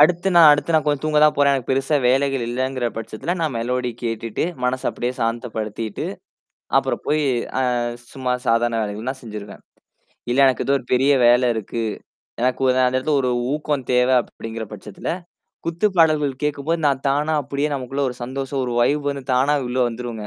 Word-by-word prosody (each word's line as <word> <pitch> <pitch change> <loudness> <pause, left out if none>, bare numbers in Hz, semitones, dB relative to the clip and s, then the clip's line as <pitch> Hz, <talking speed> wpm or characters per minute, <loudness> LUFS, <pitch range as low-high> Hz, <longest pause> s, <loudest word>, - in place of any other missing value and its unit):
அடுத்து 175 +5 +4
நான் 165 -2 +9
அடுத்து 150 +3 +2
நான் 155 - +4
கொஞ்சம் 145 -1 0
தூங்க 155 -1 +2
தான் 150 -1 +5
போறேன். 140 -1 +4
எனக்கு 130 -2 -3
பெருசா 135 +3 +2
வேலைகள் 135 0 +2
இல்லங்கிற 130 0 -1
பட்சத்தில 115 +10 -4
நான் 155 -5 -1
மெலோடி 125 +1 -1
கேட்டுட்டு 115 -1 -2 0.2
மனச 125 +1 0
அப்படியே 125 +1 -3
சாந்தப்படுத்திட்டு. 115 -2 -3 0.7
அப்புறம் - - +1
போயி 150 0 +1 0.4
அ - - +2 0.5
சும்மா 130 -2 -2
சாதாரண 115 0 +2
வேலைகள் 105 +3 -4
நான் 130 0 -7
செஞ்சுருவேன். 105 -3 -9 0.7
இல்ல 125 +3 +1
எனக்கு 130 - +1
ஏதோ 140 - +2
ஒரு 125 - -15
பெரிய 135 +3 +4
வேல 120 +1 +5
இருக்கு. 115 +1 -4 0.6
எனக்கு 125 +2 0
உ - - +4 0.2
அந்த 130 - +1
இடத்துல 145 +3 0
ஒரு 125 - 0 0.2
ஊக்கம் 150 -3 -2
தேவை 125 +1 +4
அப்படிங்கிற 115 -1 -7
பட்சத்துல, 105 -1 -7 0.6
குத்து 170 +5 +1
பாடல்கள் 150 -5 +3
கேட்கும்போது, 150 +3 -1
நான் 135 -1 0
தானா 150 +3 +1
அப்படியே 140 +2 -2
நமக்குள்ள 135 +1 -4
ஒரு 125 - -7
சந்தோஷம் 135 +2 -3
ஒரு 120 - -3
வைப் 145 +3 +1
வந்து 140 -1 -4
தானா 140 +4 +3
உள்ள 125 +1 -3
வந்துருங்க. 115 -2 -6
130 Hz, 170 wpm, -21 LUFS, 120-145 Hz, 0.7 s, நான்